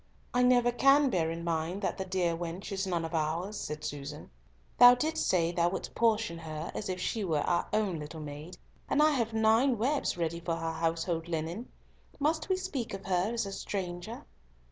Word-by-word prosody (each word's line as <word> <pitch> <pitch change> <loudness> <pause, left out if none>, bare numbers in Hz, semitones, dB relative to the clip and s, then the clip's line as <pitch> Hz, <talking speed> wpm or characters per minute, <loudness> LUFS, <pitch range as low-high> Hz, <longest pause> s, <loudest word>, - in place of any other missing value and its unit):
"I 250 - +3
never 245 -1 +4
can 275 +3 +5
bear 165 -5 +1
in 165 +1 -4
mind 170 +4 -2
that - - -1
the 190 - -2
dear 180 -3 0
wench 175 +4 -5
is 195 0 -2
none 170 -3 -1
of 165 - -6
ours," 165 +6 -1
said 150 -5 -5
Susan. 145 0 -6 0.5
"Thou 245 0 +10
didst 315 +5 -1
say 170 -2 +2
thou 175 0 +2
wouldst 190 - -5
portion 220 -6 +1
her 155 0 -6
as 210 - -4
if 185 0 -2
she 215 +3 -1
were 160 -6 +1
our 175 +3 +1
own 205 -6 0
little 150 +2 -7
maid, 150 +3 -8 0.3
and - - +2
I 305 +1 +6
have 235 -6 0
nine 225 +3 +3
webs 265 -1 0
ready 170 0 -1
for 170 0 -2
her 165 0 -2
household 165 +1 -1
linen. 170 +7 -3 0.5
Must 310 +4 0
we 375 - +2
speak 280 - -4
of 195 - -10
her 185 +2 +1
as 235 -3 -1
a 195 - -5
stranger?" 195 +3 -5
185 Hz, 200 wpm, -30 LUFS, 165-230 Hz, 0.5 s, Thou